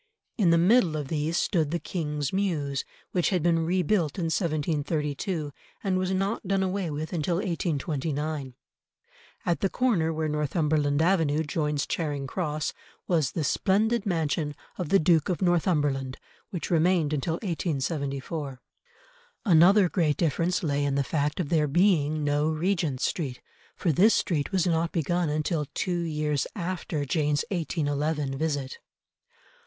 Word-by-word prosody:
In 195 -7 +3
the 170 - +5
middle 175 -2 +4
of 145 -3 -4
these 160 +2 -1
stood 160 -7 +1
the 170 - 0
King's 150 -4 -3
Mews, 155 -9 -1 0.3
which 180 -2 +1
had 180 -6 0
been 170 -1 +3
rebuilt 180 -2 +1
in 165 -3 -1
1732, 155 0 -1 0.3
and 190 -2 +1
was 185 0 -1
not 195 +2 -1
done 195 0 +2
away 190 -2 -1
with 155 +3 -4
until 170 +1 0
1829. 155 - -2 0.9
At 175 - +1
the 195 - +1
corner 190 -11 +1
where 160 0 -1
Northumberland 150 0 +1
Avenue 160 -4 +2
joins 150 -1 -1
Charing 145 -4 -2
Cross, 150 -1 -2 0.3
was 160 -7 +1
the 160 - -1
splendid 210 - +1
mansion 160 -4 -1 0.2
of 180 -5 -4
the 195 - +6
Duke 160 -3 +3
of 180 - 0
Northumberland, 150 -7 +1 0.3
which 175 -2 -5
remained 165 -2 +3
until 150 +3 -1
1874. 145 - -3 0.9
Another 185 +2 +6
great 160 -4 +1
difference 170 +3 0
lay 145 -2 0
in 140 -1 0
the 140 - +2
fact 145 +3 -1
of 165 -6 -1
there 155 -3 +2
being 155 -2 +2
no 145 +1 +1
Regent 160 -4 0
Street, 135 -7 -2 0.4
for 170 - +1
this 200 +10 +5
street 155 -4 0
was 190 -2 +2
not 165 -1 +1
begun 170 +1 0
until 150 0 -1
two 175 -2 -1
years 150 -4 -1
after 170 -4 -3
Jane's 150 0 +1
1811 150 -4 -1
visit. 145 -4 -2
160 Hz, 145 wpm, -27 LUFS, 145-180 Hz, 0.9 s, the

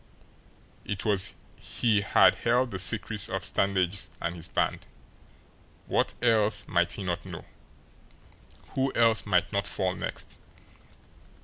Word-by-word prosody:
It 100 - -4 0.5
he 110 -4 0
had 100 - +5
held 120 +1 +1
the 95 - -4
secrets 105 0 +1
of 95 0 -3
Stangeist 95 0 0
and 85 +1 -3
his 85 0 -7
band, - - -1 1.0
what - - 0
else 110 -3 +2
might 85 -1 +1
he 100 - -5
not 90 -2 -2
know? - - -9 1.3
Who 135 0 0
else 115 -3 +3
might 90 0 +1
not 100 0 0
fall 95 -2 -1
next? - - -6
100 Hz, 120 wpm, -28 LUFS, 95-110 Hz, 1.3 s, had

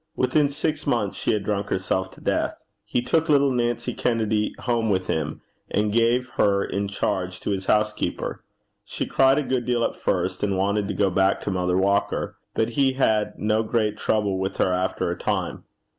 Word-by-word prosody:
Within 145 +3 +2
six 150 +1 -2
months 115 -7 0
she - - 0
had 105 -2 0
drunk 100 -1 -1
herself 95 0 -1
to - - -16
death. - - 0 0.3
He 120 - -1
took 160 +5 +1
little 140 -2 +4
Nancy 120 0 -1
Kennedy 110 -3 0
home 115 -3 0
with 95 -2 +1
him, 80 -2 -2 0.3
and 105 0 0
gave 120 +2 +3
her 100 -1 +3
in 100 0 -2
charge 95 -2 -2
to - - -2
his 95 -1 -3
housekeeper. 105 0 0 0.4
She - - -4
cried 135 0 +4
a 150 - +1
good 130 -2 -1
deal 120 -1 +1
at - - -1
first, 90 0 -1
and 100 -2 0
wanted 100 +1 +1
to - - -3
go 100 -2 +2
back 95 +2 +2
to - - -2
Mother 90 -1 0
Walker, 100 +1 +1 0.2
but 110 - +1
he 135 +2 +2
had 110 -5 +1
no 110 +1 +1
great 110 -1 0
trouble 105 -3 0
with 95 0 -3
her 90 - +2
after 90 +1 -1
a - - -2
time. - - -2
105 Hz, 190 wpm, -24 LUFS, 95-120 Hz, 0.4 s, little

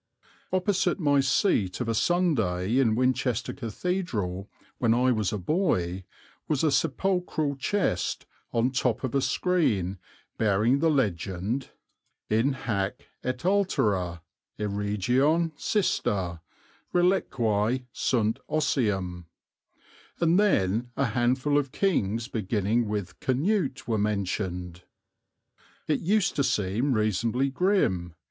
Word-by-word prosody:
Opposite 185 +1 +1
my 145 -4 +3
seat 130 - +1
of 125 - -2
a 115 - +1
Sunday 115 - +1
in 115 -5 +3
Winchester 125 -1 0
Cathedral 115 - -3 0.3
when 115 -2 +3
I 125 +1 +3
was 110 -4 0
a 105 - -2
boy, 95 - 0 0.4
was 150 -2 0
a 155 - +3
sepulchral 165 -1 0
chest 135 - -1 0.3
on 120 +2 +1
top 125 -2 0
of 130 - -2
a 140 - +2
screen 105 - 0 0.4
bearing 110 +5 +3
the 165 +2 +3
legend 105 - -1 0.6
"In 115 +6 +3
hâc 100 -6 -1 0.3
et 130 0 -1
alterâ 105 - +1 0.4
e 105 - -4
regione 120 - +1
cistâ 95 - -1 0.5
reliquiæ 125 - +1
sunt 115 0 0
ossium," 95 - 0 0.9
and 170 +2 +3
then 120 - +2
a 140 - +2
handful 130 +5 +2
of 140 -2 -4
kings 115 - 0
beginning 110 -1 0
with 100 -3 -4
Canute 145 +2 0
were 110 -3 0
mentioned. 90 -4 -2 1.1
It 150 - +1
used 200 +2 +1
to 140 - +3
seem 120 +2 0
reasonably 115 +5 +1
grim. 115 - +1
120 Hz, 110 wpm, -27 LUFS, 100-150 Hz, 1.1 s, my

